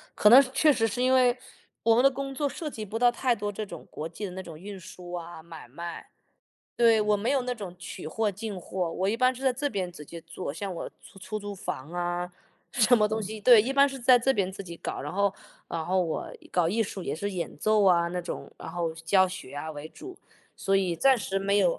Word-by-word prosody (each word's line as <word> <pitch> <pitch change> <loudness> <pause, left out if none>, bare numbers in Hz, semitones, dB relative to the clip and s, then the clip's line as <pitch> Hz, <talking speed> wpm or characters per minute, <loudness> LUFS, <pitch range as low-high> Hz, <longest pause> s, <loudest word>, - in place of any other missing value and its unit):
可 210 - +6
能 250 +5 +10
确 300 +3 +5
实 225 -5 +2
是 235 +3 -3
因 255 +1 +4
为， 250 -1 +4 0.5
我 230 0 +5
们 245 - +4
的 275 - +7
工 275 +1 -5
作 290 +2 0
涉 305 +2 -5
及 220 -6 -6
不 220 +3 -4
到 245 0 +5
太 245 0 +1
多 205 -1 -3
这 210 +1 -5
种 170 -5 -10
国 155 - -5
际 175 +5 -6
的 190 - -6
那 190 +1 -6
种 165 -3 -10
运 200 +2 -8
输 180 0 -10
啊 170 -2 -6
买 165 -4 -11
卖， 170 +7 -7 0.7
对， 230 -2 +5
我 210 0 +3
没 210 +4 -1
有 275 -2 +2
那 250 0 -2
种 200 -6 -7
取 180 - -8
货 215 +7 0
进 205 0 -6
货， 180 -1 -3
我 190 +3 -1
一 215 - +1
般 255 +1 +3
是 255 - -10
在 265 -1 +3
这 285 +4 -1
边 190 -5 -2
直 160 -4 -11
接 170 +3 -9
做， 170 -2 -6
像 195 +5 -5
我 - - -5
出 - - -15
出 215 +3 -5
租 205 -1 -6
房 155 -5 -6
啊， 175 0 -2 0.4
什 245 0 +5
么 210 -2 +4
东 220 +1 -2
西， 215 +2 -6
对， 235 0 +8
一 260 - -2
般 280 +1 +5
是 270 -1 -7
在 250 +1 +6
这 265 +3 +2
边 195 -3 0
自 195 +1 -7
己 170 -2 -9
搞。 - - -4
然 - - -5
后 200 0 +2 0.4
然 165 -1 -3
后 185 +2 +1
我 165 -3 -3 0.2
搞 175 -2 +2
艺 220 +6 +1
术 195 -2 -6
也 - - -2
是 200 +6 -3
演 180 -3 -4
奏 215 -1 +3
啊 170 -2 +4
那 180 +1 -3
种， 175 - -6
然 - - -8
后 170 -1 -2
教 175 +4 +3
学 180 -7 -8
啊 150 +2 -5
为 150 0 -8
主， 370 - -11 0.4
所 195 - +1
以 185 -3 0
暂 270 +7 +5
时 195 -3 -2
没 200 +1 +2
有 180 -4 +2
200 Hz, 275 characters per minute, -27 LUFS, 175-235 Hz, 0.7 s, 能